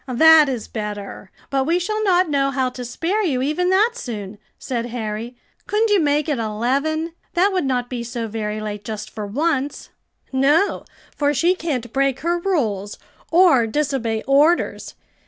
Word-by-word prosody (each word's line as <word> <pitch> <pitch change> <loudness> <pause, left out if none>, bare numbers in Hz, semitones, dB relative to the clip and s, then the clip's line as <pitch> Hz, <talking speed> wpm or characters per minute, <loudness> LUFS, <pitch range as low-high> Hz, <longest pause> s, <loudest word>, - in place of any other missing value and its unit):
"That 310 +3 +6
is 245 -5 -4
better, 205 -2 -6 0.2
but 270 -1 +1
we 335 +2 +3
shall 430 +4 -2
not 370 -2 +3
know 280 -2 +1
how 260 -1 -1
to 250 - -7
spare 345 - -1
you 265 -8 0
even 310 +6 0
that 410 +5 +4
soon," 210 - -7 0.2
said 240 -2 -3
Harry. 230 0 -5 0.3
"Couldn't 430 +1 +1
you 410 - +5
make 295 -1 +1
it 290 -5 -1
eleven? 275 +9 -1 0.2
that 385 +3 +3
would 365 -6 0
not 250 -2 0
be 245 -2 -4
so 235 -1 -4
very 215 -1 -4
late 210 -1 -5
just 215 0 -6
for 210 -2 -6
once." 285 +4 -1 0.4
"No, 290 +9 +2 0.3
for 290 0 +1
she 340 +7 +3
can't 270 -10 -4
break 270 -1 +1
her 345 +3 0
rules, 220 - -1 0.3
or 325 -9 +5
disobey 235 -4 -1
orders. 295 +5 +2
270 Hz, 165 wpm, -21 LUFS, 230-330 Hz, 0.4 s, That